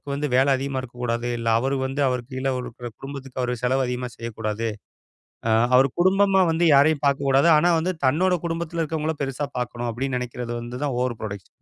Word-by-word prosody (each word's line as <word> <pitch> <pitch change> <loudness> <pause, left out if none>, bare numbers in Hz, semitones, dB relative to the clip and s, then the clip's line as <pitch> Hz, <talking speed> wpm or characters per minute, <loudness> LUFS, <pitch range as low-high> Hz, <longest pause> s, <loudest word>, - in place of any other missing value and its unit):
வந்து 150 +1 -1
வேல 130 +2 +5
அதிகமா 135 0 -3
இருக்கக் 125 -1 -10
கூடாது, 120 0 -1
இல்ல 115 0 -2
அவரு 135 +3 0
வந்து 135 +2 -3
அவருக்கு 125 +1 -3
கீழ 130 +1 -1
ஒரு 125 - -5
குடு 120 - -5
குடும்பத்துக்கு 135 -2 -7
அவர் 125 - -1
செலவு 130 +1 +2
அதிகமா 125 0 -3
செய்யக் 115 -1 -7
கூடாது. 110 +1 -1 0.8
அ - - +2 0.3
அவர் 135 +1 +5
குடும்பமா 190 +1 +4
வந்து 165 +1 +1
யாரையும் 145 +2 +4
பாக்கக் 140 0 +1
கூடாது. 135 +5 +4
ஆனா 175 +3 +4
வந்து 180 +3 0
தன்னோட 180 +7 +3
குடும்பத்துல 165 0 -2
இருக்கவங்கள 160 0 -2
பெருசா 135 +1 -2
பாக்கணும் 120 0 -3
அப்படின்னு 130 +3 -2
நெனைக்கறது, 120 -1 -5
வந்து 125 +3 -7
தான் 135 -4 -1
ஓவர் 125 -3 -1
ப்ரோடக்ஷன். 100 -3 -6
130 Hz, 195 wpm, -24 LUFS, 125-150 Hz, 0.8 s, வேல